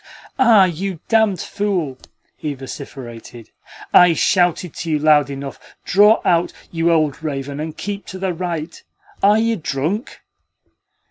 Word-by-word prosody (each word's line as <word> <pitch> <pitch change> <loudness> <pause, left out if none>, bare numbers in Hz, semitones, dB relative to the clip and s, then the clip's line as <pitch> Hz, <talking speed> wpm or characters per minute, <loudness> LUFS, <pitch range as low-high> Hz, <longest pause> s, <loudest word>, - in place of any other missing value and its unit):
"Ah, 230 -6 +6
you 185 0 -4
damned 220 -5 +3
fool!" 180 -11 -2 0.4
he 150 -2 -4
vociferated. 125 -3 -10 0.4
"I 180 -1 +7
shouted 175 -3 +1
to 165 - -5
you 155 - +2
loud 150 -1 +4
enough! 140 0 -7 0.3
Draw 210 +3 +4
out, 170 0 +2 0.2
you 165 0 +1
old 155 -4 +1
raven, 140 -2 -4
and 155 0 -5
keep 200 0 -5
to 190 - -7
the 185 -1 -2
right! 170 -2 -5 0.4
Are 205 +2 +5
you 225 0 +1
drunk?" 160 - -3
170 Hz, 135 wpm, -19 LUFS, 145-195 Hz, 0.4 s, I